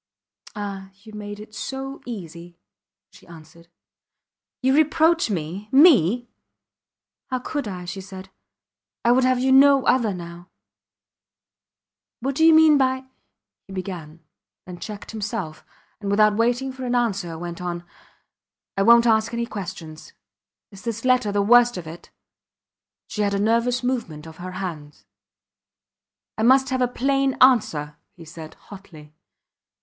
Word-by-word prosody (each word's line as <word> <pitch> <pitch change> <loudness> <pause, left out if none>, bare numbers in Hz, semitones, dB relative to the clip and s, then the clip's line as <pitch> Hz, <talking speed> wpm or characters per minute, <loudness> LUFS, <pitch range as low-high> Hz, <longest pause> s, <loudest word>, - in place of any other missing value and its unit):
Ah! 200 -2 -6
You 215 -1 -13
made 205 0 -7
it 215 0 -12
so 270 +4 -6
easy, 175 -6 -9 0.5
she - - -19
answered. 165 0 -15 1.0
You 265 +1 +3
reproach 320 0 +3
me 185 +3 -5
me! 250 - +5 1.0
How 255 - -1
could 280 0 -4
I? 180 -3 -6
she 185 +2 -6
said; 190 0 -11 0.7
I 235 - +5
would 255 +1 +3
have 255 0 +2
you 260 +1 +1
no 275 0 +6
other 235 -5 +2
now. 175 -1 -9 1.7
What 270 +3 -2
do 320 - 0
you 325 - +7
mean 315 -2 +6
by... 260 0 0 0.6
he 195 - -11
began, 175 -4 -7 0.4
then 180 -1 -10
checked 210 -2 -8
himself, 205 -7 -5 0.4
and 200 -2 -5
without 210 +1 +3
waiting 245 +4 0
for 260 0 -8
an 245 0 -1
answer 200 -9 -1
went 175 +1 -7
on, 175 -1 -4 0.9
I 195 - 0
wont 235 +3 +6
ask 220 -1 +2
any 235 0 -1
questions. 175 -7 -8 0.6
Is 195 -1 -13
this 230 0 -5
letter 255 -5 +2
the 200 0 +1
worst 240 +2 +5
of 175 - -7
it? 165 +2 -11 1.0
She 210 - -5
had 200 -1 0
a - - -1
nervous 235 +4 +1
movement 230 -12 -3
of 160 -1 -12
her 185 +1 -8
hands. 165 -6 -7 1.3
I - - 0
must 265 +3 +4
have 260 -1 -1
a 250 - +3
plain 270 +2 0
answer, 165 - +3 0.2
he 170 -3 -13
said, 160 0 -11
hotly. 160 -7 -14
210 Hz, 145 wpm, -23 LUFS, 175-255 Hz, 1.7 s, you